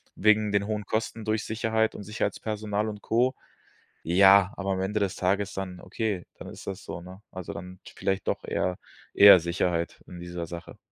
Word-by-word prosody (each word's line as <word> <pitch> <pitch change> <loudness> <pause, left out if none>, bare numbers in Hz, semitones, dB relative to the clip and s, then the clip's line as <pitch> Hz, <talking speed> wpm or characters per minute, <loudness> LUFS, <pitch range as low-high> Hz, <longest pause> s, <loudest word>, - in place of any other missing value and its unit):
wegen 105 0 +3
den 100 0 +1
hohen 105 -2 -3
Kosten 110 +1 -2
durch 110 -1 -1
Sicherheit 110 0 0
und - - -7
Sicherheitspersonal 105 +1 -2
und 105 -1 -8
Co. 125 +5 +1 0.7
Ja, 95 +2 +6
aber 100 0 -2
am 95 - -2
Ende 105 +3 -1
des 100 -2 -1
Tages 95 +2 0
dann 95 -2 -5
okay, 100 -1 -3
dann - - -8
ist - - -11
das 95 0 -5
so, - - -6
ne? 95 +3 -12
Also 90 -2 -6
dann 90 0 -9 0.2
vielleicht 95 0 -2
doch - - -1
eher 90 -1 -1 0.4
eher 100 -2 +9
Sicherheit 85 0 -1
in 90 - -10
dieser 85 -1 -5
Sache. 85 0 -9
100 Hz, 180 wpm, -27 LUFS, 90-105 Hz, 0.7 s, eher